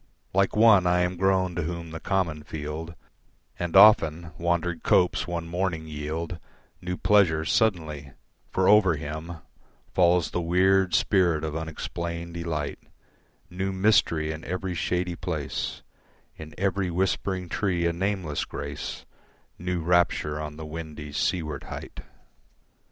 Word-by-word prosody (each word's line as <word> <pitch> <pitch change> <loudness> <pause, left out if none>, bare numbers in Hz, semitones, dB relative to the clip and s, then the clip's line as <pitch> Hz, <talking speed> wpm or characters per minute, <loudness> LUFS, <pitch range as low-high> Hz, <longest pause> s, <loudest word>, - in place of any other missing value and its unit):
Like 95 0 +2
one 105 -4 +6
I 90 0 +3
am 90 +1 0
grown 95 0 +1
to 85 - -2
whom 85 0 -5
the 80 - -6
common 85 -6 -1
field 80 +2 -6 0.6
And 85 -2 -3
often 85 -5 +6
wandered 85 -1 -1
copse 90 -1 +2
one 85 -1 -3
morning 90 -2 -2
yield 80 +3 -5 0.4
New 90 0 -4
pleasures 80 -7 +3
suddenly; 80 -10 0 0.4
for 95 0 +1
over 105 -5 +6
him 80 +3 -6 0.6
Falls 90 -2 +3
the 90 - -1
weird 90 +1 +3
spirit 85 -6 +2
of 80 -1 -3
unexplained 85 +1 -5
delight, 80 -4 -3 0.7
New 95 +2 -2
mystery 95 -6 +2
in 80 +1 -7
every 90 +1 -3
shady 90 +1 -1
place, 80 -6 -4 0.5
In 80 0 -10
every 95 -1 0
whispering 90 +1 -1
tree 90 -1 -1
a 85 - +1
nameless 90 -4 -2
grace, 70 0 -6 0.5
New 90 0 -2
rapture 80 -3 +1
on 75 0 -6
the 80 - -7
windy 75 -1 -7
seaward 75 -2 -2
height. - - -8
85 Hz, 130 wpm, -26 LUFS, 80-90 Hz, 0.7 s, one